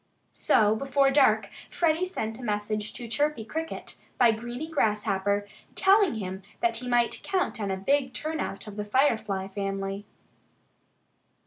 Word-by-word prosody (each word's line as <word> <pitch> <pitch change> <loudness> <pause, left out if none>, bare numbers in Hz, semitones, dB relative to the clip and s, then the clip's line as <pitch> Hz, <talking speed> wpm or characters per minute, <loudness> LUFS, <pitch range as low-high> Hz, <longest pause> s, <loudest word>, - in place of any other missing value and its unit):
So 215 0 +3
before 275 +3 +2
dark 220 -7 +4 0.2
Freddie 335 +1 +1
sent 225 -11 -4
a - - -8
message 210 -1 -2
to 240 - -6
Chirpy 290 -1 0
Cricket 320 +6 -5 0.2
by 240 -2 +6
Greenie 240 +6 -5
Grasshopper, 205 -5 +1 0.3
telling 390 - +4
him 190 -2 -5 0.2
that 230 -1 +1
he 250 +1 -5
might 240 -1 +2
count 370 - -1
on 200 - -2
a 190 - -1
big 265 +6 +1
turnout 305 -11 -4
of 210 -1 -9
the 210 - -3
Firefly 215 -5 +1
family. 195 0 -4
225 Hz, 140 wpm, -27 LUFS, 205-280 Hz, 0.3 s, by